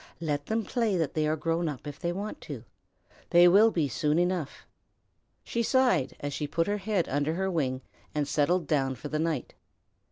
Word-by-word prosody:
"Let 145 -3 -2
them 220 0 0
play 225 -3 0
that 160 -4 -1
they 155 -1 +1
are 155 - +1
grown 165 +2 -1
up 145 -2 -7
if 145 +1 -7
they 170 -1 -1
want 200 +4 -5
to. - - -7 0.7
They 175 0 +7
will 205 +5 +7
be 165 -8 0
soon 150 +4 0
enough." 175 -4 -1 0.8
She 235 - -2
sighed 250 - +2
as 145 0 -4
she 150 - -3
put 165 +3 0
her 205 +2 0
head 200 -3 0
under 145 +3 0
her 190 +1 -1
wing 130 -6 -1 0.3
and 150 -1 0
settled 165 +4 +1
down 135 -3 0
for 150 - -7
the 155 - -1
night. 160 -5 -2
165 Hz, 195 wpm, -28 LUFS, 145-185 Hz, 0.8 s, They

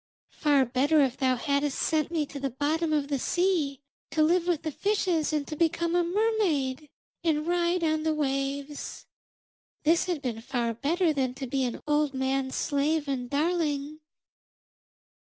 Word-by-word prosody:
Far 285 -3 +3
better 270 +6 +2
if 265 -2 +1
thou 260 -1 +2
hadst 280 +2 0
sent 310 -2 +1
me 325 -3 0
to 280 0 -8
the 275 0 -1
bottom 305 +5 -1
of 295 -2 +1
the 280 -2 -1
sea, 330 -5 0 0.3
to 310 - +2
live 345 +2 +2
with 340 -4 0
the 315 - -2
fishes 365 -4 0
and 300 -2 0
to 310 - -5
become 335 +1 +1
a 350 - +3
mermaid 340 -9 0 0.3
and 310 -2 +1
ride 345 0 +1
on 315 -1 +1
the 315 0 0
waves. 275 0 -3 0.8
This 330 +2 +3
had 350 -5 -2
been 230 -3 -3
far 235 -1 -1
better 320 - +1
than 260 -3 -1
to 265 - -5
be 265 +1 -1
an 240 - -4
old 295 -2 +1
man's 265 0 -1
slave 295 +1 0
and 250 -3 -2
darling.' 300 -1 -1
295 Hz, 165 wpm, -28 LUFS, 275-330 Hz, 0.8 s, Far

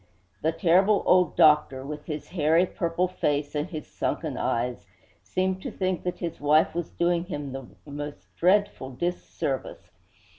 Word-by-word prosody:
The 160 - +2
terrible 185 +5 +3
old 180 -3 +4
doctor, 150 -3 +4
with 150 +1 -7
his 150 -2 -5
hairy, 165 +1 +3
purple 170 0 -1
face 145 -4 -1
and 150 +3 -2
his 155 -4 -6
sunken - - -3
eyes, 120 +1 -2 0.3
seemed 185 0 -1
to - - -4
think 185 -2 -2
that 180 - -2
his 170 -2 -5
wife 150 +2 +4
was 170 -1 -3
doing 175 0 0
him 145 -6 -5
the 135 -1 -7 0.2
most 145 0 -8
dreadful 185 -7 +2
dis 175 +8 -2
service. 135 -2 -4
160 Hz, 155 wpm, -26 LUFS, 145-180 Hz, 0.3 s, old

